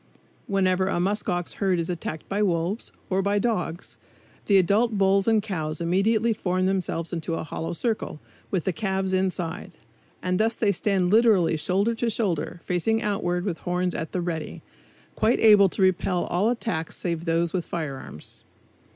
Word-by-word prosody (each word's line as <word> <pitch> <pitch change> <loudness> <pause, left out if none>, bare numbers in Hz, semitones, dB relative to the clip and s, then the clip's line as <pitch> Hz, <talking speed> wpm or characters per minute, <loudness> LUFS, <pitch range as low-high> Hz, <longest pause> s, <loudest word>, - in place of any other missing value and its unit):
Whenever 190 -1 +2
a 195 - 0
musk 200 +4 -1
ox 175 -1 -2
herd 190 -3 +1
is 165 -1 -1
attacked 160 -3 -5
by 200 +2 -1
wolves, 180 +2 -1 0.2
or 190 +1 +2
by 200 +1 +1
dogs, 185 -6 -2 0.5
the 200 - +5
adult 205 +4 +3
bulls 195 +1 +3
and 220 -2 +3
cows 160 -7 -3
immediately 210 +7 +2
form 185 -2 -1
themselves 185 -3 -1
into 165 0 -2
a - - -3
hollow 160 +1 -4
circle, 215 -4 -2 0.3
with 185 -5 -1
the 190 - -1
calves 190 0 -1
inside; 185 -1 -2 0.5
and 180 0 0
thus 225 +1 +2
they 210 -3 +2
stand 190 -1 +1
literally 215 -7 +4
shoulder 195 +8 +1
to 230 +1 -1
shoulder, 175 -6 -1
facing 220 +6 0
outward 180 -3 -1
with 180 -5 -2
horns 180 0 -1
at 160 - -4
the 180 - -1
"ready," 165 -2 -4 0.5
quite 225 +3 +2
able 210 -3 +7
to 190 - 0
repel 185 -1 +2
all 195 +6 +1
attacks 225 -9 -2
save 170 -2 -3
those 165 0 +1
with 180 -2 0
firearms. 140 - -6
185 Hz, 170 wpm, -25 LUFS, 170-205 Hz, 0.5 s, able